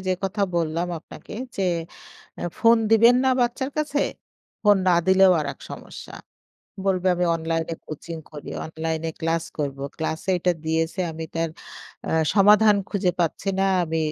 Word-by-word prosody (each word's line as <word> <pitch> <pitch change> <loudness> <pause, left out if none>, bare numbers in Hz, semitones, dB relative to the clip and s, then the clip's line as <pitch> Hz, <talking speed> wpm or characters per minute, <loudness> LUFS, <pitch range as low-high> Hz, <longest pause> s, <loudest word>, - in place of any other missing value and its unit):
যে 185 - +3
কথা 195 +2 -1
বললাম 170 +1 0
আপনাকে - - -13 0.2
যে, 195 - -1 0.8
আ - - -5 0.2
ফোন 230 +1 +6
দিবেন 230 +2 +7
না 265 - +4
বাচ্চার 245 +3 0
কাছে। 295 -1 0 0.6
ফোন 205 -1 +6
না 180 - +5
দিলেও 190 0 +6
আরেক 150 - -4
সমস্যা। - - -9 0.7
বলবে 190 -1 +1
আমি 180 0 0
অনলাইনে 165 0 -2
কোচিং 160 +2 -7
করি, 150 -2 -9
অনলাইনে 160 0 -3
ক্লাস 165 0 0
করব। 140 -2 -2 0.2
ক্লাসে 160 +3 -2
এটা 180 +1 +2
দিয়েছে 160 +3 -1
আমি 160 0 -6
তার 165 0 -1 0.6
আ - - -1 0.2
সমাধান 210 +1 +6
খুঁজে 195 -3 +1
পাচ্ছি 170 +3 -1
না। 195 - +3 0.2
আমি 160 0 -2
175 Hz, 150 wpm, -24 LUFS, 160-205 Hz, 0.8 s, দিবেন